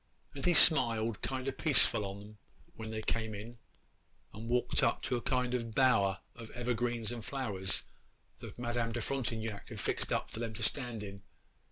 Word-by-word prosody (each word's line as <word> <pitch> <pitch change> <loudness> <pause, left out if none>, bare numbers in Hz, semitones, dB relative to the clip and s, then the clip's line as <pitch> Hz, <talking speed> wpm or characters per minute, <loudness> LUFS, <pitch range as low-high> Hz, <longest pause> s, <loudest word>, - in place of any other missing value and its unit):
and 140 +2 -4
he 175 - +4
smiled 115 -9 +5
kind 130 0 -4
o' - - +1
peaceful 130 -6 +6
on 100 +1 -7
'em 105 +1 -14 0.4
when 110 -1 -7
they 110 0 -5
came 110 -1 -2
in 115 +3 -9 0.7
and 110 +3 -8
walked 125 0 +1
up - - +1
to 125 - -1
a 120 - -2
kind 125 -1 -1
o' 125 -2 0
bower 110 -5 +2
of 115 -2 -10
evergreens 120 -1 -2
and 120 -2 -6
flowers 105 -8 0 0.6
that - - -10
Madame 120 -1 -2
de 120 - -3
Frontignac 115 -5 -3
had - - -8
fixed - - -2 0.2
for - - -9
them 115 -2 -4
to 115 - -4
stand 120 -3 -2
in. 100 -1 -9
115 Hz, 180 wpm, -32 LUFS, 110-125 Hz, 0.7 s, peaceful